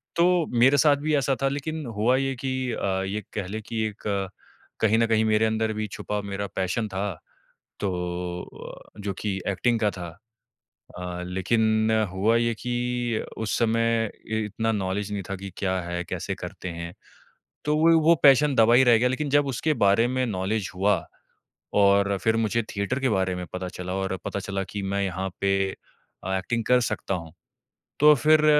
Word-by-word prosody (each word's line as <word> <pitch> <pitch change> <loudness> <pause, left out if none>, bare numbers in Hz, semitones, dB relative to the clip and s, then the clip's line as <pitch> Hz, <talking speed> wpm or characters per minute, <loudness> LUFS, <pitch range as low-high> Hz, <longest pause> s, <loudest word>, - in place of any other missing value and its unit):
तो 175 -1 +3
मेरे 135 +4 +6
साथ 145 -1 +5
भी 155 -1 +2
ऐसा 135 -1 +1
था - - +4
लेकिन 150 +2 -4
हुआ 120 +5 +3
ये 135 -1 -1
कि 130 -1 -1 0.2
अ, 95 -1 -1
ये 105 +2 -3
कह 100 -3 -3
लें 110 +3 -5
कि 115 -1 -3
एक 100 -2 -3 0.5
कहीं 110 0 +4
न 115 - +4
कहीं 110 -1 +3
मेरे 110 0 +3
अंदर 110 0 0
भी 105 0 -3
छुपा 105 +1 -4
मेरा 100 0 -4
पैशन 95 +4 -1
था, 95 0 -2 0.7
तो 90 -2 -3
अ, - - -12
जो 100 -1 -3
कि 100 -3 -1
एक्टिंग 115 +4 +1
का 105 - +2
था। 90 -2 -7 0.9
अ, 90 0 -5
लेकिन 110 +4 +1 0.2
हुआ 105 +5 +2
ये 115 0 +1
कि 120 -1 -1 0.2
उस 110 -1 -1
समय 115 -1 +1 0.2
इ 110 0 -1
इतना 110 +2 -1
नॉलेज 100 0 -2
नहीं 100 -1 -2
था 95 - -2
कि 95 +1 -8
क्या 95 -1 0
है? 85 0 -3
कैसे - - -4
करते 90 - -7
हैं? 85 0 -6 0.7
तो 150 0 +2
वो 165 +2 +5
ही 165 - +6
वो 170 - +7
पैशन 140 0 +6
दबा 115 +1 +5
ही 130 - +7
रह 120 -2 +6
गया 125 +2 +2
लेकिन 145 +3 -2
जब 145 0 +4
उसके 150 +4 0
बारे 115 +5 +4
में 130 0 0
नॉलेज 100 0 -2
हुआ 100 -1 +1 0.8
और 100 0 +4
फिर 115 0 +3
मुझे 115 +1 +1
थिएटर 100 +7 -1
के 130 - +2
बारे 95 -3 +1
में 90 0 -5
पता 90 0 -4
चला 90 0 -4
और 95 0 -2
पता 100 - -2
चला 100 0 -3
कि 100 - -4
मैं 100 0 0
यहाँ 95 0 -2
पे 95 -1 +1 0.5
अ, 95 - -1
एक्टिंग 115 +5 -2
कर 125 0 +4
सकता 95 - -3
हूँ। 85 -2 -7 0.7
तो 150 +1 +8
फिर 155 +3 +4
110 Hz, 190 wpm, -25 LUFS, 95-120 Hz, 0.9 s, तो